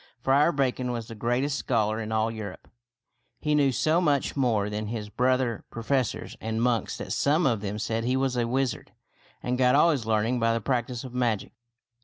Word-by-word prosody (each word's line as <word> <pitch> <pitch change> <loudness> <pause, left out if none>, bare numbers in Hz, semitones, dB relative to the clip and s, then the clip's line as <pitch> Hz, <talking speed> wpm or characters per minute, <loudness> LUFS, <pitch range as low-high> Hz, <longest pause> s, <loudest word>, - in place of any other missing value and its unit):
Friar 140 +5 +3
Bacon 130 -3 0
was 115 -2 -4
the - - -8
greatest 125 +6 0
scholar 110 -3 0
in 110 0 -5
all 110 0 +1
Europe. 110 -4 -8 0.7
He 150 - 0
knew 145 -2 +4
so 155 +7 +2
much 145 -5 +1
more 115 -7 +1
than 105 0 -3
his 105 -1 -4
brother 125 0 +1
professors 125 +1 -2
and 110 0 -2
monks 120 -3 0
that - - -4
some 155 +4 +2
of 115 -6 +1
them 105 0 -3
said 110 +2 -2
he 125 +2 +1
was 130 -1 0
a 120 -1 0
wizard 130 -1 -2 0.5
and 125 +1 -1
got 125 0 +4
all 165 +4 +5
his 130 -8 -2
learning 110 +3 +1
by 115 0 +2
the - - 0
practice 120 +1 -2
of 130 -2 -8
magic. 120 -5 0
120 Hz, 195 wpm, -27 LUFS, 110-135 Hz, 0.7 s, all